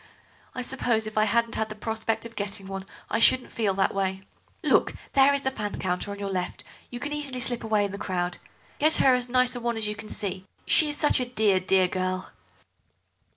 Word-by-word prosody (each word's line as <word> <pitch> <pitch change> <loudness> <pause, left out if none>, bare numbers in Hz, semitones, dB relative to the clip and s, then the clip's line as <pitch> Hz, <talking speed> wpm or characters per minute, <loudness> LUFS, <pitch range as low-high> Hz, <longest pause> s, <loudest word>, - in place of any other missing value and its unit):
I 255 - -3
suppose 240 -4 0
if 215 - -7
I 215 0 +4
hadn't 230 +1 +1
had 220 0 -1
the 215 - -7
prospect 220 +1 -2
of 230 0 -10
getting 200 -1 -4
one 195 0 -6 0.2
I 225 - +1
shouldn't 255 +2 +4
feel 205 -4 0
that 195 0 +1
way. 190 -1 -2 0.4
Look, - - +3 0.2
there 275 0 +6
is 280 0 0
the 265 - 0
fan 210 -5 -4
counter, 180 +2 -2
on 200 - -5
your 200 -1 -4
left; 180 -1 -3 0.3
you 245 - -6
can 290 +3 -4
easily 285 -4 -3
slip 245 -2 0
away 215 -2 +2
in 200 - -4
the 200 - -6
crowd. 175 -2 -2 0.4
Get 310 +2 +4
her 265 - +5
as 250 -1 0
nice 255 0 +3
a - - -3
one 235 -1 -2
as 220 - +1
you 210 - -2
can 210 +1 -9
see—she 195 - 0
is 295 - -1
such 295 - +3
a 250 - 0
dear, 215 -6 +2
dear 185 0 +3
girl." 185 0 -3
220 Hz, 220 wpm, -26 LUFS, 195-250 Hz, 0.4 s, there